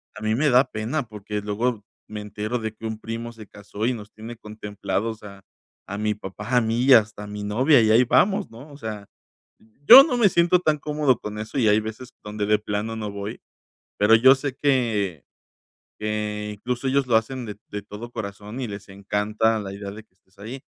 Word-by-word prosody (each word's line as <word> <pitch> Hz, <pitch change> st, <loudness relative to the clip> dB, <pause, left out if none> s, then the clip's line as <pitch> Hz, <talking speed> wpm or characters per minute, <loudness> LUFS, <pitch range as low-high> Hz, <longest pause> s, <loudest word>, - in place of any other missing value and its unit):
a -, -, -10 dB
mí 110 Hz, 0 st, +1 dB
me 150 Hz, +5 st, +2 dB
da 125 Hz, 0 st, +6 dB
pena, 115 Hz, +8 st, -2 dB
porque 105 Hz, -1 st, -5 dB
luego 105 Hz, +2 st, -2 dB, 0.2 s
me 105 Hz, -1 st, -6 dB
entero, 105 Hz, +3 st, -4 dB
de 110 Hz, -1 st, -4 dB
que 110 Hz, -, -10 dB
un 110 Hz, -1 st, -5 dB
primo 115 Hz, +1 st, -6 dB
se 110 Hz, -2 st, -12 dB
casó, 105 Hz, +1 st, -6 dB
y 125 Hz, -, +2 dB
nos 105 Hz, -3 st, -9 dB
tiene 115 Hz, +2 st, -9 dB
contemplados, 105 Hz, 0 st, -4 dB
a 100 Hz, -1 st, -12 dB, 0.4 s
a 100 Hz, -, -5 dB
mi 105 Hz, 0 st, 0 dB
papá, 105 Hz, +5 st, -5 dB
a -, -, +5 dB
mí, 115 Hz, +2 st, 0 dB
y 135 Hz, -, +7 dB
hasta 105 Hz, -3 st, +3 dB
a -, -, -8 dB
mi 105 Hz, 0 st, -6 dB
novia. 125 Hz, +7 st, +4 dB
Y 110 Hz, -, +2 dB
ahí 115 Hz, +3 st, +6 dB
vamos, 195 Hz, -, +2 dB
¿no? 130 Hz, +7 st, -12 dB
O 140 Hz, -, -12 dB
sea, 105 Hz, -6 st, -7 dB, 0.8 s
yo 260 Hz, +3 st, +12 dB
no 265 Hz, -6 st, -1 dB
me 220 Hz, -4 st, +6 dB
siento 175 Hz, +1 st, +4 dB
tan 155 Hz, -4 st, +1 dB
cómodo 150 Hz, -4 st, +1 dB
con 105 Hz, 0 st, -6 dB
eso, 110 Hz, +5 st, -5 dB
y 115 Hz, -4 st, +3 dB
hay 105 Hz, +1 st, +5 dB
veces, 110 Hz, +4 st, -8 dB
donde 105 Hz, 0 st, -3 dB
de 105 Hz, 0 st, +3 dB
plano, 105 Hz, +2 st, -3 dB
no 105 Hz, -2 st, -4 dB
voy. 100 Hz, +1 st, -6 dB, 0.6 s
Pero 105 Hz, +2 st, +6 dB
yo 130 Hz, +4 st, +7 dB
sé 135 Hz, -1 st, -4 dB
que 115 Hz, -, 0 dB, 0.7 s
que, 105 Hz, 0 st, -3 dB
incluso, 125 Hz, +5 st, -4 dB
ellos 135 Hz, 0 st, +1 dB
lo 120 Hz, -, +3 dB
hacen 125 Hz, +3 st, -3 dB
de 105 Hz, -2 st, -7 dB
de 105 Hz, -, -5 dB
todo 115 Hz, +4 st, -9 dB
corazón, 105 Hz, +1 st, -7 dB
y 125 Hz, -, -3 dB
les 100 Hz, -1 st, -9 dB
encanta 105 Hz, +3 st, 0 dB
la 100 Hz, -2 st, -6 dB
idea 100 Hz, 0 st, -7 dB
de 110 Hz, +2 st, -10 dB
que 110 Hz, -, -43 dB
estés 95 Hz, +1 st, -33 dB
ahí. 120 Hz, +6 st, -8 dB
110 Hz, 215 wpm, -24 LUFS, 105-125 Hz, 0.8 s, yo